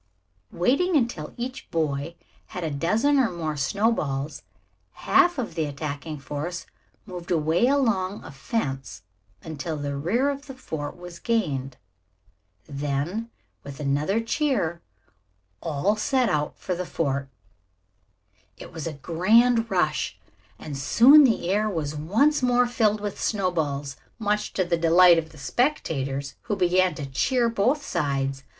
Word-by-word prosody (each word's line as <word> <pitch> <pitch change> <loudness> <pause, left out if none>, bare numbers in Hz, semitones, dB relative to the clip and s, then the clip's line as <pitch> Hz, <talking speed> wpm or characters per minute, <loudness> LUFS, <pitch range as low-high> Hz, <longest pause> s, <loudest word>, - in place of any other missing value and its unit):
Waiting 280 - +2
until 230 - -2
each 255 +2 -6
boy 155 -1 -2 0.3
had 180 - -6
a 160 - -2
dozen 215 - +2
or 250 - +3
more 160 -3 -3
snowballs, 150 -3 -1 0.5
half 355 -2 +3
of 245 -9 -3
the 160 -1 -1
attacking 145 +1 -5
force 150 +5 -5 0.4
moved 180 -4 -8
away 165 +6 +2
along 220 -9 +1
a - - -9
fence 135 - -4 0.4
until 160 0 -5
the 145 -1 -3
rear 225 - +1
of 280 +1 -8
the 270 - -8
fort 160 - -6
was 175 -1 -10
gained. 140 - -1 0.9
Then, 145 +10 -3 0.3
with 140 0 -9
another 150 +8 0
cheer, 230 - -1 0.8
all 165 +7 0
set 250 +2 +1
out 150 -3 -1
for 185 - -3
the 180 +1 -3
fort. 140 -3 -2 1.3
It - - -11
was 160 -1 -5
a 160 - -4
grand 225 - +3
rush - - 0 0.4
and 150 - -7
soon 255 - +7
the 225 -8 +1
air 210 +2 +1
was 155 -6 -3
once 225 - +2
more 245 0 +3
filled 215 -4 +1
with 205 -2 -5
snowballs, 155 -9 -1 0.2
much 210 -1 -1
to 185 - 0
the 170 -1 +1
delight 170 +1 +6
of 160 -1 -6
the 160 - -16
spectators, 140 - -1 0.2
who 205 - +1
began 185 -1 +2
to 145 - -5
cheer 235 - +1
both 250 +7 +1
sides. 135 - -1
175 Hz, 140 wpm, -25 LUFS, 145-230 Hz, 1.3 s, soon